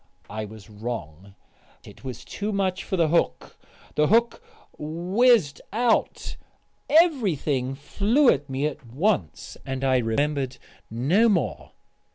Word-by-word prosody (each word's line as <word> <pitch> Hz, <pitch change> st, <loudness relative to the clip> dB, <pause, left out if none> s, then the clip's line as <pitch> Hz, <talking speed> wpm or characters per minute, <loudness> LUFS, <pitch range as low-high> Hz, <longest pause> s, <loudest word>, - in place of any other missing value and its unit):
I 110 Hz, +1 st, -4 dB
was 110 Hz, -1 st, -12 dB
wrong. 100 Hz, -5 st, -7 dB, 0.5 s
It -, -, -15 dB
was 130 Hz, -3 st, -7 dB
too 205 Hz, +1 st, -4 dB
much 195 Hz, -2 st, -1 dB
for 190 Hz, -, -3 dB
the 165 Hz, -2 st, +3 dB
hook. 170 Hz, -, 0 dB, 0.4 s
The 150 Hz, 0 st, +2 dB
hook 235 Hz, -, +2 dB, 0.4 s
whizzed 175 Hz, -, +2 dB
out, 230 Hz, +2 st, 0 dB, 0.5 s
everything 185 Hz, -, +2 dB
flew 210 Hz, -, +1 dB
at 140 Hz, +1 st, +1 dB
me 135 Hz, +2 st, -1 dB
at 150 Hz, -2 st, -4 dB
once, 125 Hz, -, -1 dB
and 135 Hz, 0 st, -4 dB
I 130 Hz, -1 st, +3 dB
remembered 130 Hz, +3 st, -1 dB, 0.3 s
no 155 Hz, -, +3 dB
more.... 160 Hz, -, -1 dB
150 Hz, 125 wpm, -25 LUFS, 125-200 Hz, 0.5 s, the